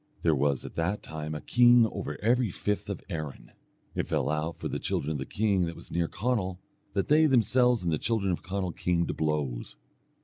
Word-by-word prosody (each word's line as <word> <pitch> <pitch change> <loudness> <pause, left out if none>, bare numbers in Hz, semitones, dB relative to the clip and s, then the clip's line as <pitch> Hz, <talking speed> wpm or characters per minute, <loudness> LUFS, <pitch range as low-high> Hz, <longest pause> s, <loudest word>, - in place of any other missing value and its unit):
There 80 - +4
was 70 -2 +1
at - - -8
that 90 +5 -1
time 80 0 -5
a 75 - -5
king 120 -1 +6
over 110 - -4
every 120 0 +3
fifth 105 +3 -2
of - - -4
Erin. 75 -3 -6 0.4
It - - -2
fell - - 0
out 75 +2 -2
for - - -4
the - - -3
children 75 - -1
of 75 - -1
the 70 - -5
king 100 -4 +1
that 85 - -5
was - - -11
near 85 -1 +1
Conall, 95 -4 -1 0.4
that 100 - 0
they 155 +1 +5
themselves 125 -2 +3
and 85 -2 0
the 75 - 0
children 110 -5 0
of 85 - -2
Conall 95 -1 -3
came 85 -1 +1
to - - -2
blows. 75 -6 -2
90 Hz, 210 wpm, -28 LUFS, 80-110 Hz, 0.4 s, king